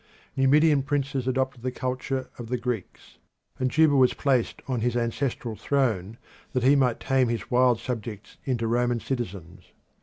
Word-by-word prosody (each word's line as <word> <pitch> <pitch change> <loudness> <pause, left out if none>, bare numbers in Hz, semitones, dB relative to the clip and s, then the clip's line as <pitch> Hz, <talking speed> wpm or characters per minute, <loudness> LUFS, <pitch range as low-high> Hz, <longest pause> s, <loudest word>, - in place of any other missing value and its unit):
Numidian 145 +2 +4
princes 140 -2 -2
adopted 130 -1 -1
the 130 - -1
culture 130 +1 -3
of 120 - -6
the 125 +2 -1
Greeks, 120 -4 -5 0.4
and 130 0 +1
Juba 155 +1 +4
was 130 -2 +4
placed 130 -5 0
on 130 -3 -1
his 120 +1 0
ancestral 120 -1 -2
throne 110 -4 0 0.4
that 125 - 0
he 135 +3 +6
might 130 -4 +2
tame 135 -2 +2
his 115 -4 -3
wild 125 -2 +4
subjects 115 -4 -6
into 120 -4 -1
Roman 120 +1 +1
citizens. 95 -9 -6
125 Hz, 155 wpm, -26 LUFS, 115-135 Hz, 0.4 s, he